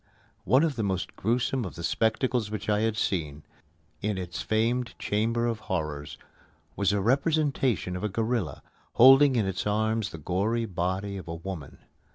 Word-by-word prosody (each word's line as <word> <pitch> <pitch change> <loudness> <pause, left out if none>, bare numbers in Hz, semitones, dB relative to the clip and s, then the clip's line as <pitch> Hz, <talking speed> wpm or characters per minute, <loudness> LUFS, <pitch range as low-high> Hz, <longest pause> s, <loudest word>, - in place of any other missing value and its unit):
One 130 - +4
of 155 -6 0
the 110 - 0
most 95 -2 -2
gruesome 120 +4 0
of 95 - -6
the 85 - -7
spectacles 115 +3 0
which 105 -2 -5
I 105 0 +3
had 110 0 0
seen 75 -8 -2 0.6
in 105 -1 -1
its 90 -2 -5
famed 115 +3 0
Chamber 115 +3 0
of 115 -2 -1
Horrors 75 -5 -3 0.6
was 100 -1 +2
a 105 - +1
representation 135 - +1
of 90 - -5
a 105 - 0
gorilla, 110 -3 -2 0.3
holding 135 +2 +7
in 110 -4 +2
its 95 +2 -2
arms 110 0 0
the 80 - -8
gory 100 +9 -1
body 95 +1 -2
of 95 - -9
a 85 - -4
woman. 85 -4 -7
105 Hz, 170 wpm, -27 LUFS, 95-120 Hz, 0.6 s, holding